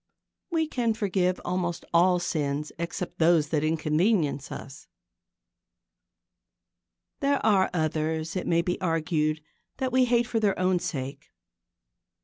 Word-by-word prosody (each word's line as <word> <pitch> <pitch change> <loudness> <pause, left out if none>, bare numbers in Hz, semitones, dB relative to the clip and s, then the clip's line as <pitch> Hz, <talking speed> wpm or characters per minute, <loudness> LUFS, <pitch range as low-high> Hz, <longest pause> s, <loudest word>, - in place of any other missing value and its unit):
We 325 -3 0
can 235 -6 0
forgive 185 -4 0
almost 175 -1 -2
all 180 +2 +5
sins 150 -4 -2
except 170 +2 -4
those 160 -2 +4
that 155 -2 0
inconvenience 155 -1 +1
us. 135 +1 -9 2.3
There 280 0 +2
are 195 -3 +4
others, 160 0 -1
it 185 - -2
may 170 0 +2
be 180 +3 -2
argued, 155 -3 0 0.4
that 260 -1 -1
we 255 0 +4
hate 240 -1 +2
for 230 -1 -1
their 205 -3 +1
own 185 0 +2
sake. 135 -3 -5
175 Hz, 125 wpm, -27 LUFS, 155-200 Hz, 2.3 s, all